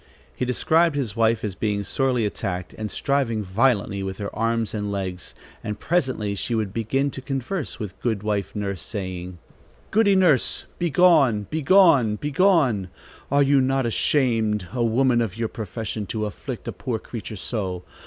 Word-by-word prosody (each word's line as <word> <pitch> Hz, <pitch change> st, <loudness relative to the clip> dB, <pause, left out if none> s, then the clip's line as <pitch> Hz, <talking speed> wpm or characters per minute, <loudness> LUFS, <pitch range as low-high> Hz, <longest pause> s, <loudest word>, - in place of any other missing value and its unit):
He 125 Hz, -, -1 dB
described 160 Hz, +6 st, +2 dB
his 125 Hz, -8 st, -2 dB
wife 115 Hz, 0 st, +2 dB
as 105 Hz, -3 st, -2 dB
being 100 Hz, +1 st, -1 dB
sorely 125 Hz, +1 st, 0 dB
attacked 90 Hz, -3 st, -4 dB
and 110 Hz, -1 st, -4 dB
striving 130 Hz, -6 st, 0 dB
violently 100 Hz, 0 st, +1 dB
with 95 Hz, 0 st, -4 dB
her 100 Hz, -1 st, -5 dB
arms 115 Hz, 0 st, 0 dB
and 105 Hz, -2 st, -2 dB
legs, 95 Hz, -2 st, -5 dB, 0.3 s
and 105 Hz, 0 st, -4 dB
presently 130 Hz, -11 st, 0 dB
she 115 Hz, +4 st, -2 dB
would 105 Hz, -3 st, -2 dB
begin 135 Hz, +6 st, 0 dB
to 135 Hz, -, -7 dB
converse 135 Hz, +5 st, -3 dB
with 95 Hz, -4 st, -7 dB
Good 110 Hz, -4 st, -1 dB
wife 105 Hz, -2 st, -2 dB
Nurse, 100 Hz, -3 st, -3 dB
saying: 90 Hz, -3 st, -5 dB, 0.5 s
"Goody 205 Hz, -2 st, +4 dB
Nurse, 175 Hz, -9 st, +2 dB
begone! 160 Hz, -, +4 dB
begone! 155 Hz, -, +5 dB
begone! 145 Hz, -, +2 dB, 0.4 s
Are 140 Hz, +1 st, +4 dB
you 140 Hz, 0 st, +4 dB
not 135 Hz, 0 st, +1 dB
ashamed, 110 Hz, -, +1 dB
a 125 Hz, -2 st, 0 dB
woman 120 Hz, +1 st, +3 dB
of 110 Hz, -3 st, -3 dB
your 115 Hz, -1 st, -1 dB
profession, 110 Hz, 0 st, -5 dB
to 110 Hz, +1 st, -2 dB
afflict 105 Hz, -, -6 dB
a -, -, -1 dB
poor 120 Hz, -3 st, -3 dB
creature 110 Hz, -1 st, -7 dB
so? 95 Hz, -3 st, -4 dB
115 Hz, 160 wpm, -24 LUFS, 105-135 Hz, 0.5 s, begone